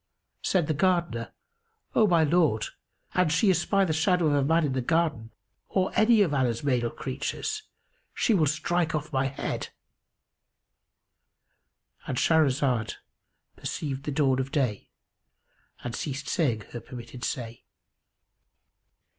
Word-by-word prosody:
Said 180 -4 +1
the 155 - 0
Gardener, 170 -8 0 0.6
"O 215 - +4
my 170 -4 +4
lord, 155 -8 +2 0.5
an 180 -3 +3
she 175 +6 +4
espy 195 +3 +2
the 160 - 0
shadow 175 +2 +2
of 150 - +3
a 140 -1 +3
man 165 +3 +3
in 140 - -1
the 130 - 0
garden 150 -5 0 0.4
or 190 -1 +1
any 215 -1 +5
of 165 -7 -1
Allah's 125 -4 0
male 125 -4 +1
creatures 135 - -4 0.5
she 235 - +2
will 160 -7 +3
strike 165 +2 0
off 150 +1 -4
my 135 0 +2
head;"——And 135 -1 -11
Shahrazad 135 -8 +2 0.6
perceived 140 -2 -4
the 150 - -2
dawn 135 -3 +2
of 130 +1 -3
day 125 -9 -1 0.9
and 120 -1 -4
ceased 140 -1 -4
saying 125 -11 +1
her 120 - -5
permitted 120 0 -10
say. 115 -2 -4
150 Hz, 130 wpm, -27 LUFS, 130-170 Hz, 0.9 s, any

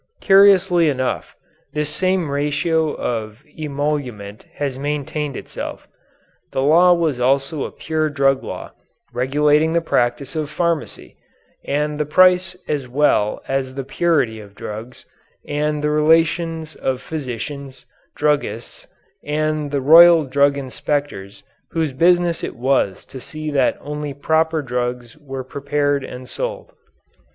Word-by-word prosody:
Curiously 190 -4 +5
enough, 130 -2 -2 0.4
this 150 -1 -1
same 185 -5 0
ratio 150 +2 0
of 110 +1 -4
emolument 140 -9 -4
has 135 -3 -3
maintained 145 0 -3
itself. - - -7 0.6
This - - -2
law 165 +6 +5
was 160 -7 0
also 135 +4 +1
a - - -6
pure 155 -1 -2
drug 135 -2 +1
law, - - -7 0.4
regulating 150 +5 +2
the 170 - +3
practice 130 -2 0
of 155 -2 -2
pharmacy, 170 0 -3 0.5
and 150 +1 -1
the 150 - -1
price 185 +3 +4
as 140 -4 -2
well 125 -5 +1
as 135 -1 -2
the 135 - -3
purity 135 -6 0
of 100 -1 -13
drugs, 110 +5 -8 0.4
and 150 0 -1
the 150 - +1
relations 160 +1 +2
of 130 -1 -2
physicians, 140 -1 -6 0.3
druggists, 145 -6 -2 0.4
and 155 0 -1
the 140 -1 -1
royal 165 +3 +8
drug 140 +1 +2
inspectors 135 -6 -4 0.3
whose 160 -4 -1
business 175 +3 +2
it - - -4
was 125 -6 0
to 130 - -10
see 155 +2 -6
that 135 -3 +2
only 150 -1 -5
proper 160 +2 +1
drugs 125 -2 -3
were 135 -3 -6
prepared 140 +1 -1
and 125 -1 -8
sold. - - -5
145 Hz, 125 wpm, -20 LUFS, 130-160 Hz, 0.6 s, royal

